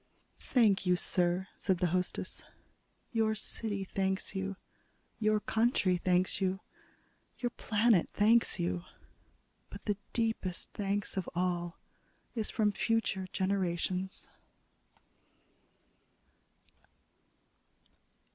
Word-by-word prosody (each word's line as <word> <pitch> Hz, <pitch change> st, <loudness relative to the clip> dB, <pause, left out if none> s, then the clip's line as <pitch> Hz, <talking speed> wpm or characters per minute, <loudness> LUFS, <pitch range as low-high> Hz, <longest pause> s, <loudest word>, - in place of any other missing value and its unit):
"Thank 210 Hz, -7 st, +3 dB
you, 180 Hz, -, +5 dB
sir," 180 Hz, +1 st, +1 dB
said 190 Hz, -2 st, +1 dB
the 180 Hz, -, +1 dB
hostess. 180 Hz, 0 st, -1 dB, 0.7 s
"Your 220 Hz, -2 st, +2 dB
city 210 Hz, -2 st, -3 dB
thanks 190 Hz, 0 st, -1 dB
you; 195 Hz, 0 st, -2 dB, 0.6 s
your 215 Hz, -1 st, +3 dB
country 220 Hz, -4 st, +2 dB
thanks 180 Hz, +2 st, +1 dB
you; 190 Hz, 0 st, +1 dB, 0.8 s
your 245 Hz, -1 st, -1 dB
planet 220 Hz, -4 st, +3 dB
thanks 225 Hz, +3 st, +4 dB
you. 85 Hz, 0 st, -1 dB, 0.9 s
But -, -, -10 dB
the 205 Hz, -2 st, 0 dB
deepest 225 Hz, -6 st, -1 dB
thanks 200 Hz, 0 st, -2 dB
of 190 Hz, -, -1 dB
all 175 Hz, -1 st, -1 dB, 0.6 s
is 220 Hz, -3 st, -2 dB
from 215 Hz, -2 st, +2 dB
future 205 Hz, -3 st, 0 dB
generations." 185 Hz, -1 st, -1 dB
195 Hz, 90 wpm, -32 LUFS, 180-215 Hz, 0.9 s, you